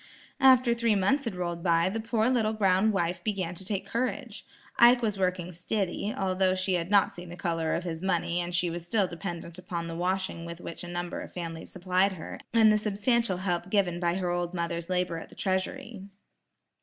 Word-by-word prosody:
After 255 -3 +6
three 235 -2 +2
months 260 +9 +2
had 225 -5 -3
rolled 175 -1 -3
by, 170 0 +3
the 210 +4 -2
poor 225 0 +1
little 230 -4 +2
brown 200 0 +3
wife 175 -2 -1
began 190 -5 -2
to 180 - -5
take 195 0 -2
courage. 250 +2 -3 0.3
Ike 240 +1 +7
was 210 -3 0
working 180 -1 0
"stiddy" 190 +3 -2
although 185 -1 +1
she 185 0 0
had 175 0 -1
not 205 0 +5
yet - - -19
seen 175 0 -9
the 175 - -7
color 165 -3 -1
of 170 - -2
his 165 -2 -4
money 175 -2 0
and 175 0 -3
she 175 -1 +1
was 170 0 -5
still 200 +3 +1
dependent 170 -1 -6
upon 175 -2 -4
the 165 - -5
washing 180 -1 -1
with 170 0 -7
which 170 - -8
a - - -7
number 175 0 -4
of - - -9
families 165 -2 -6
supplied 185 +2 +1
her, 175 - -8
and 225 -2 +6
the 215 - +3
substantial 210 0 +1
help 180 -1 -2
given 190 -4 +1
by 175 -1 +1
her 180 -2 -1
old 175 0 -2
mother's 170 0 -3
labor 180 -2 0
at - - -10
the - - -15
treasury. 190 +3 -2
185 Hz, 210 wpm, -28 LUFS, 175-205 Hz, 0.3 s, Ike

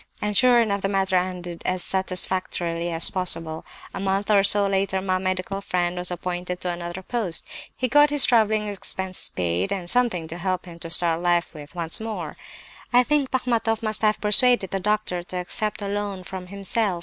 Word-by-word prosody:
"And 210 0 -2
sure 245 +1 +6
enough 200 -4 +1
the 195 - 0
matter 195 -1 0
ended 180 -2 -2
as 185 -1 -1
satisfactorily 180 -2 -1
as 165 0 +5
possible. 165 -4 -1 0.3
A - - -5
month 195 +2 0
or 200 -2 +5
so 200 0 +5
later 195 -1 0
my 185 -1 -1
medical 185 +2 -2
friend 180 -2 -1
was 180 0 -2
appointed 180 0 -4
to 180 - -1
another 175 +1 -6
post. 205 -7 -1 0.3
He 255 - 0
got 295 +3 +5
his 290 -1 +4
travelling 215 -2 +3
expenses 190 -2 -2
paid, 90 +1 -1
and 185 -3 -3
something 220 -7 +1
to 170 +2 -6
help 185 0 -2
him 170 -1 -11
to 165 - -4
start 170 0 +4
life 175 -1 +1
with 150 0 -11
once 165 -2 -1
more. 220 0 -5 0.6
I 245 0 +5
think 285 0 +1
Bachmatoff 235 -3 0
must 215 -1 -1
have 215 -1 +2
persuaded 215 -1 +3
the 195 - -1
doctor 210 -3 -1
to 180 +1 -7
accept 210 +4 -2
a - - -3
loan 200 -2 -3
from 185 0 -7
himself. 200 0 -1
190 Hz, 190 wpm, -24 LUFS, 175-210 Hz, 0.6 s, sure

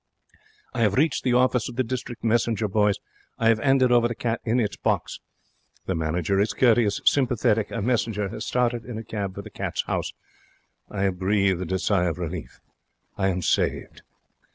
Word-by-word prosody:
I 120 - -2
have 105 -3 +3
reached 150 +1 +2
the 125 - +2
office 125 -1 +2
of - - -9
the 130 - +1
District 120 -1 -5
Messenger 115 -1 +1
Boys. 105 0 +2 0.4
I 115 - +3
have 115 -1 +3
'anded 135 -1 +3
over 120 -1 +5
the 120 - -4
cat 115 0 -2
in 120 +2 +1
its 105 -4 -1
box. - - -1 0.7
The 95 - -1
manager 85 +3 0
is 105 +1 +1
courteous, 115 -4 +3
sympathetic. 120 -5 +2
A - - -3
messenger 110 -4 0
has 110 - -6
started 120 -1 0
in 120 -3 -7
a 110 - -5
cab 100 -3 -4
for - - -6
the - - -11
Cats' - - -3
House. - - -3 0.8
I 100 -1 -3
have 95 -2 0
breathed 95 -2 +1
a 95 - +2
sigh 95 -1 +1
of 85 -1 -1
relief. 85 -1 -6 0.6
I 95 - 0
am 90 -2 -1
saved. - - -1
110 Hz, 185 wpm, -25 LUFS, 95-120 Hz, 0.8 s, over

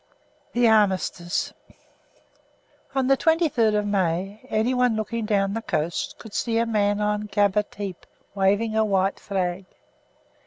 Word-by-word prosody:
THE 240 0 +4
ARMISTICE 190 -5 +1 1.4
On 265 -1 +2
the 270 +1 +4
23rd 275 -9 +2
of 210 - 0
May 195 +1 -1
anyone 245 +2 +2
looking 220 +1 -3
down 200 -2 +1
the 225 - -3
coast 165 -5 -2
could 220 -3 -12
see 230 -2 0
a 230 - +2
man 205 -2 +1
on 210 0 -1
Gaba 205 0 +3
Tepe 200 -3 -8 0.3
waving 205 +3 +1
a 220 - +3
white 195 -2 +1
flag. 185 -1 -2
210 Hz, 130 wpm, -24 LUFS, 195-225 Hz, 1.4 s, THE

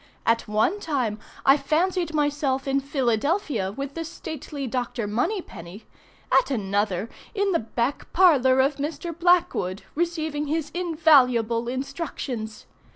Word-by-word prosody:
At 230 0 +2
one 215 - +1
time 255 - -1 0.3
I 275 +2 +7
fancied 335 +5 0
myself 290 -2 0
in 270 0 +2
Philadelphia 270 - 0
with 275 +5 -5
the 330 - -4
stately 310 -3 -6
Dr. 245 -2 -2
Moneypenny, 210 - -3 0.5
at - - +4
another 205 -4 -1 0.3
in 400 -1 +1
the 340 - +2
back 235 +4 -3
parlor 270 -8 +5
of 275 +2 +1
Mr. 300 +3 -4
Blackwood 340 - +2
receiving 315 -3 -2
his 310 0 -2
invaluable 265 -10 +3
instructions. 255 -4 -5
275 Hz, 120 wpm, -25 LUFS, 230-320 Hz, 0.5 s, I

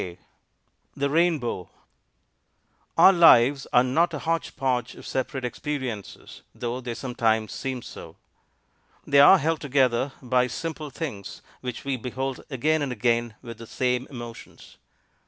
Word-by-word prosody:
_ 90 -1 -7 0.8
THE 140 0 -1
RAINBOW 155 - 0 1.3
Our 195 - +8
lives 140 -6 +6
are 125 - +5
not 160 +6 +1
a - - -2
hodge 165 +2 -2
podge 125 -3 -1
of - - -12
separate 130 0 -3
experiences, 125 -5 -6
though 120 +1 -4
they 120 -2 -5
sometimes 115 -4 0
seem 130 -2 -4
so. 80 -1 -10 0.9
They 140 0 +4
are 145 +7 +9
held 160 0 -1
together 130 -2 +1
by 125 -1 +1
simple 155 +2 -5
things 130 - -7 0.2
which 125 0 -6
we 135 -2 -1
behold 130 +2 -4
again 155 +3 +1
and 140 -3 -2
again 120 -1 0
with 115 -2 -9
the 115 - -10
same 125 +1 -1
emotions. 120 -3 -11
130 Hz, 140 wpm, -25 LUFS, 120-145 Hz, 1.3 s, are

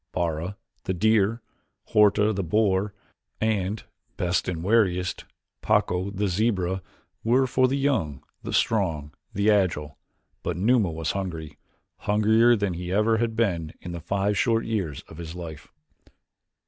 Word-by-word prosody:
Bara, 85 +3 -2 0.3
the 95 - -1
deer, 110 +3 +2 0.5
Horta, 105 0 +4
the 100 - -1
boar, 100 +2 +1 0.4
and, 105 -2 0 0.3
best 90 -1 0
and 85 -3 -3
wariest, 90 -4 +1 0.4
Pacco, 90 +2 +1
the 100 +1 -1
zebra, 95 -2 0 0.4
were 125 +4 +3
for 130 0 +3
the 135 +2 0
young, 110 - 0 0.2
the - - -6
strong, 95 -9 +1
and 75 - -14 0.2
the 100 +2 +3
agile, 80 -8 0 0.4
but - - -3
Numa 110 0 +3
was 80 -1 -2
hungry 85 -6 -5 0.4
hungrier 110 +3 +4
than 100 -4 -1
he 90 +1 -5
ever 105 +3 +3
had 115 0 -1
been 85 -9 0
in 90 - -7
the 85 -1 -6
five 100 +4 0
short 115 -2 +2
years 95 - -2
of 80 - -14
his 85 0 -7
life. 80 -4 -8
100 Hz, 145 wpm, -25 LUFS, 85-110 Hz, 0.5 s, Horta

